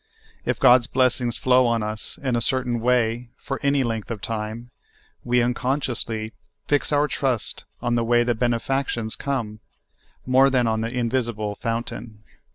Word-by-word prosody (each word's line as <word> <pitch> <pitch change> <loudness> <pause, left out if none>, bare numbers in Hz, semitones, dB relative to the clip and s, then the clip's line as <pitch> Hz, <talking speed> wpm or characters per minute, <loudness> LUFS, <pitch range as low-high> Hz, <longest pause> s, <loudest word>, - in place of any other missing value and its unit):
If - - -1
God's 125 -2 +6
blessings 125 -2 +1
flow 130 -1 +4
on 115 -2 +1
us 105 0 -5
in 130 -3 0
a 120 - 0
cer 130 +2 +3
tain 120 -2 -2
wa}', 120 0 +1
for 135 -1 -5
any 140 -1 +2
length 115 -2 -3
of 115 -3 -4
time, 110 +3 -5 0.5
we 125 0 +2
unconsciously 120 -3 -2 0.3
fix 145 +1 +1
our 145 0 +3
trust 130 -6 -1 0.2
on 120 -1 +1
the 120 -1 +2
w^ay 120 +1 +3
the 120 - +2
benefactions 120 0 -1
come, 120 -7 -3 0.7
more 130 +2 +5
than 130 -2 +2
on 110 -1 0
the 115 - -2
invisible 115 -4 -1
fountain. 115 -1 -5
120 Hz, 160 wpm, -23 LUFS, 115-130 Hz, 0.7 s, God's